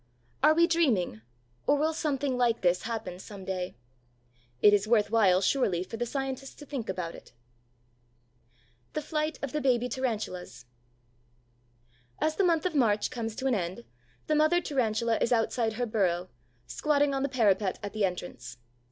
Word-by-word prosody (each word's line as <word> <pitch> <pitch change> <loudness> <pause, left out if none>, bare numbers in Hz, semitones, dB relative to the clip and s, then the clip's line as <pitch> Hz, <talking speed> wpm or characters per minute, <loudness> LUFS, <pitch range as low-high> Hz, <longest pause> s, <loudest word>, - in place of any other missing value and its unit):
Are 305 +3 +6
we 335 +1 +6
dreaming, 255 - +1 0.5
or 290 - +4
will 310 +2 +1
something 285 -4 -1
like 240 -2 +1
this 180 -1 +2
happen 210 -6 -4
some 195 -1 -10
day? 185 -1 -3 0.8
It 205 - +6
is 205 +1 +2
worth 215 -2 +3
while 195 -5 +4
surely 190 -6 +1
for 205 - -8
the 240 +1 -2
scientists 270 +1 -4
to 295 - -11
think 270 -8 -5
about 180 -3 -3
it. - - -14 1.6
THE 305 - -2
FLIGHT 305 0 -2
OF 280 - -2
THE 300 - -2
BABY 250 -2 +2
TARANTULAS 220 - -4 1.5
As 310 0 +1
the 395 - +2
month 335 -3 +2
of 365 - 0
March 220 -7 +2
comes 225 -2 -4
to 265 - -5
an 265 - +3
end, 175 - -3 0.4
the 310 - 0
mother 310 +3 +4
Tarantula 235 -7 0
is 235 - +1
outside 225 -1 +1
her 245 +2 -1
burrow, 185 -5 0 0.4
squatting 290 - +1
on 270 - -1
the 275 - 0
parapet 210 -6 +2
at 205 - -5
the 215 -1 -1
entrance. 150 -10 -4
235 Hz, 165 wpm, -29 LUFS, 195-280 Hz, 1.6 s, Are